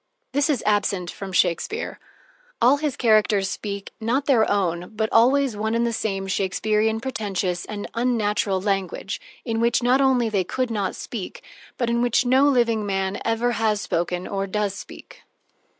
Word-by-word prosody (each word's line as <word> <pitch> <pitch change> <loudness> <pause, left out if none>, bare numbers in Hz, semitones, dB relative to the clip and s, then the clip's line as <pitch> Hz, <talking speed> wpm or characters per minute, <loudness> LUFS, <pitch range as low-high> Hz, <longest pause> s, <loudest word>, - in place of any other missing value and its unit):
This 285 +3 +1
is 275 -7 0
absent 200 -4 +1
from 195 -1 -7
Shakespeare. 180 - 0 0.6
All 255 +4 +5
his 295 -2 -2
characters 215 -4 +3
speak, 200 -1 -5
not 250 +6 0
their 240 -6 +3
own, 180 -1 -1
but 220 0 0
always 260 +1 +4
one 220 +2 -1
and 235 0 +2
the 235 - -1
same 195 -3 -2
Shakespearian, 210 +3 0
pretentious, 200 -7 -2
and 205 -1 -6
unnatural 210 -5 0
language, 195 +1 -2 0.2
in 225 -2 -1
which 235 +1 +2
not 255 +3 +4
only 260 -3 +3
they 205 -4 +1
could 255 +6 -2
not 205 -4 -1
speak, 215 -6 -7 0.3
but 240 - 0
in 235 0 +1
which 245 +1 +2
no 265 +3 +4
living 235 -5 +2
man 195 -1 -2
ever 230 +2 +1
has 220 -3 +1
spoken 175 -1 -2
or 195 0 -2
does 205 0 -1
speak. - - -11
220 Hz, 165 wpm, -23 LUFS, 195-240 Hz, 0.6 s, All